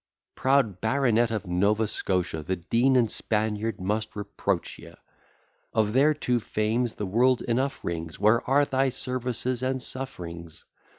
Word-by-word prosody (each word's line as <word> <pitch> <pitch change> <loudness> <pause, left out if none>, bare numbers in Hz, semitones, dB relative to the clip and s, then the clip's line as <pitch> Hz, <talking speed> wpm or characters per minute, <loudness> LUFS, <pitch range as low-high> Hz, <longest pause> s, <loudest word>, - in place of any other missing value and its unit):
Proud 130 -9 +1
baronet 120 -1 +2
of 110 -2 -3
Nova 100 +5 +2
Scotia! 90 -5 -2
The 95 +5 -2
Dean 115 +9 +2
and 120 -4 +3
Spaniard 110 -1 -1
must 105 +4 -2
reproach 105 -1 -3
ye: - - -13 0.8
Of 110 -1 +1
their 145 +4 +4
two 125 -4 0
fames 110 +2 -1
the 105 - -3
world 120 +6 +2
enough 130 +4 -1
rings: 80 -1 -4
Where 110 +3 +4
are 145 +2 +4
thy 135 0 +1
services 125 -1 -2
and 130 0 -1
sufferings? 85 -11 -7
115 Hz, 140 wpm, -26 LUFS, 105-130 Hz, 0.8 s, their